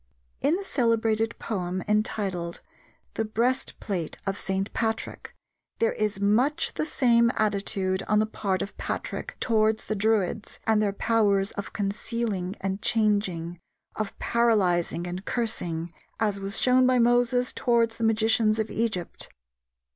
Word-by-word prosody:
In 310 - +3
the 395 +2 -4
celebrated 225 - +1
poem 185 -4 -3
entitled 195 -5 -1 0.5
The 225 - -1
Breastplate 220 - -2
of 195 - -1
St. 195 0 -2
Patrick, 225 -1 -3 0.4
there 225 - +2
is 210 -2 -1
much 250 +11 +2
the 310 - -2
same 235 -5 +4
attitude 195 -2 0
on 210 - +3
the 215 - +3
part 195 -3 -2
of 200 - -8
Patrick - - -4
towards 220 -1 +2
the - - -2
Druids 210 0 0
and 220 -1 +3
their 205 -1 +1
powers 200 -2 +2
of 200 - -6
concealing 200 -2 -2
and 195 +1 -2
changing, 200 -7 +1 0.4
of 215 -2 -4
paralyzing 185 -8 +1
and 180 +2 -5
cursing, 175 -8 -2 0.3
as 210 -3 0
was 195 +2 +1
shown 255 0 +5
by 255 0 +4
Moses 245 +1 +3
towards 230 -2 +1
the 230 - -4
magicians 220 0 +3
of 220 0 -2
Egypt. 215 -7 -2
215 Hz, 135 wpm, -26 LUFS, 195-230 Hz, 0.5 s, shown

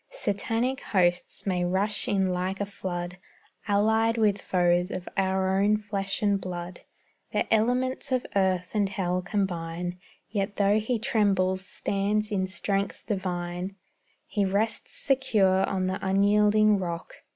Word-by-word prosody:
Satanic 230 - -1
hosts 175 -3 0
may 180 -3 0
rush 195 +4 0
in 190 -2 +1
like 185 +2 -2
a 205 - 0
flood, 180 -3 -5 0.5
Allied 220 +3 +3
with 210 -3 +2
foes 175 -1 +2
of 180 - -5
our 190 0 +1
own 210 +1 +4
flesh 200 -1 -3
and 200 -1 +2
blood, 175 -1 -6 0.5
The - - +1
elements 250 +5 +1
of 255 -1 +1
earth 185 -2 +1
and 205 -2 +1
hell 185 -2 -1
combine, 180 -2 -3 0.3
Yet 200 -1 -2
tho' 205 +1 +3
he 230 +3 -1
trembles, 200 -6 +1
stands 205 +2 -1
in 190 -2 0
strength 195 +2 -2
divine; 180 -2 -3 0.5
He 205 - -1
rests 200 +3 0
secure 215 -9 +2
on 190 -1 -1
the 185 +1 -1
unyielding 205 +2 +4
rock. 170 -2 -5
195 Hz, 135 wpm, -27 LUFS, 185-210 Hz, 0.5 s, own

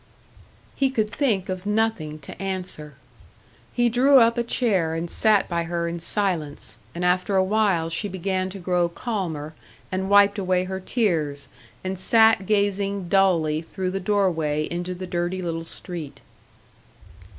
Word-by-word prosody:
He 270 -1 +2
could 220 -5 -1
think 220 -11 0
of 185 +1 -4
nothing 210 -8 0
to - - -10
answer. 185 -6 -4 0.8
He 240 -1 +2
drew 260 +4 +5
up 230 -2 +5
a 240 - +1
chair 195 -10 +1
and 165 +1 -3
sat 210 +3 +3
by 170 -1 -1
her 170 0 -2
in 170 0 -4
silence, 170 -5 -2 0.2
and 175 +1 -2
after 180 +2 +1
a 190 - +4
while 195 -4 +1
she 165 +6 -1
began 185 0 -2
to 195 - -8
grow 180 -2 0
calmer, 170 -7 -4 0.4
and 190 +1 -2
wiped 205 0 +5
away 185 -1 +1
her 190 +1 -4
tears, 160 - -1 0.4
and 185 0 -3
sat 220 -1 +4
gazing 200 -2 0
dully 170 -6 +3
through 185 +2 -4
the 195 - -2
doorway 170 -7 0
into 175 +1 -3
the 185 +1 -6
dirty 175 +1 -2
little 165 -1 -3
street. 165 -4 -7
185 Hz, 150 wpm, -24 LUFS, 170-205 Hz, 0.8 s, drew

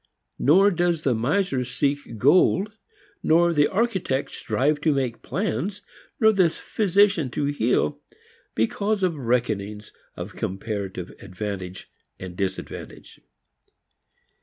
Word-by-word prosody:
Nor 190 +8 +5
does 175 -3 0
the 130 - +2
miser 135 - 0
seek 125 0 -2
gold, 185 - +4 0.5
nor 170 +2 +4
the 145 -2 +4
architect 190 - -1
strive 150 +3 0
to 155 - +3
make 130 -4 -2
plans, 200 +4 -3 0.4
nor 220 -1 +6
the 185 -4 +4
physician 200 - +2
to 140 - -2
heal, 125 - +1 0.6
because 200 - 0
of 180 -3 +1
reckonings 110 -5 -2 0.2
of - - -7
comparative 95 -2 -4
advantage 95 -1 -6 0.3
and 90 -1 -7
disadvantage. 95 0 -6
145 Hz, 110 wpm, -24 LUFS, 110-185 Hz, 0.6 s, nor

